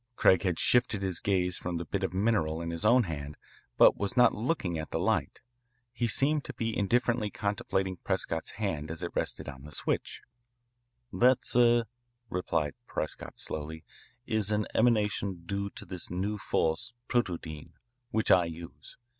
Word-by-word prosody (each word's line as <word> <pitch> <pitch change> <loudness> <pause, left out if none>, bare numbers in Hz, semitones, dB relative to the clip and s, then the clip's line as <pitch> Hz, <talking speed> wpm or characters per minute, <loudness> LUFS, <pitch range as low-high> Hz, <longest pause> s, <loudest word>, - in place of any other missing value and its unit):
Craig 95 -5 +5
had 90 -2 0
shifted 120 -5 +3
his 95 -3 0
gaze 90 -3 +1
from 90 -1 -3
the 85 - -4
bit 100 +4 -2
of 95 - 0
mineral 95 -5 +1
in 85 0 -3
his 85 +3 -3
own 120 +3 +6
hand, 75 -5 -5 0.4
but - - +7
was 100 +4 -2
not 125 - +6
looking 105 - -1
at 80 - -5
the - - -2
light. - - 0 0.5
He 120 -1 0
seemed 140 +6 +2
to - - -7
be 115 -1 -2
indifferently 115 +1 +1
contemplating 95 -2 -2
Prescott's 80 -1 -2
hand 80 -9 -3
as 80 +2 -4
it 85 - -3
rested - - -2
on 65 - -8
the 75 +2 -11
switch. - - -2 0.9
"That, 125 +1 +4
sir," 120 -1 +4 0.5
replied 80 -5 -1
Prescott - - -4
slowly, 80 +1 -5 0.4
"is 110 -2 0
an 105 0 +1
emanation 105 -6 +1
due 100 +2 -2
to - - -7
this 90 -2 -6
new 100 +4 -2
force, 80 +8 0
protodyne, 85 -10 -2 0.4
which 110 0 +1
I 90 -2 +6
use. 85 0 -9
95 Hz, 165 wpm, -30 LUFS, 85-110 Hz, 0.9 s, but